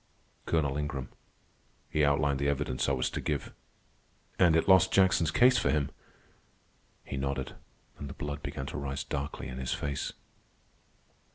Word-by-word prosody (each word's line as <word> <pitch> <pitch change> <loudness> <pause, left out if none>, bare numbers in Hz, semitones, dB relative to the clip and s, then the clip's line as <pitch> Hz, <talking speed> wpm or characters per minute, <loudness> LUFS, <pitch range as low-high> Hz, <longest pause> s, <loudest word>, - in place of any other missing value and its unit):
"Colonel 70 -4 +1
Ingram. 70 -3 -3 0.8
He 75 - +2
outlined 70 -1 +2
the 70 - 0
evidence 70 -2 -1
I - - +2
was 65 -2 0
to - - -3
give." 75 -3 -3 0.9
"And 85 -3 +6
it 80 - +2
lost 95 -1 +6
Jackson's 95 -4 +4
case 125 +9 +5
for - - +1
him." 75 -3 +1 1.1
He 70 - -5
nodded, 70 -1 -2 0.5
and 70 - -6
the 70 - -8
blood 75 -1 -4
began 65 - -5
to 70 - -5
rise 70 -1 -3
darkly 70 -2 -4
in 65 -1 -6
his 65 -1 -1
face. 70 -1 -3
70 Hz, 155 wpm, -30 LUFS, 70-80 Hz, 1.1 s, And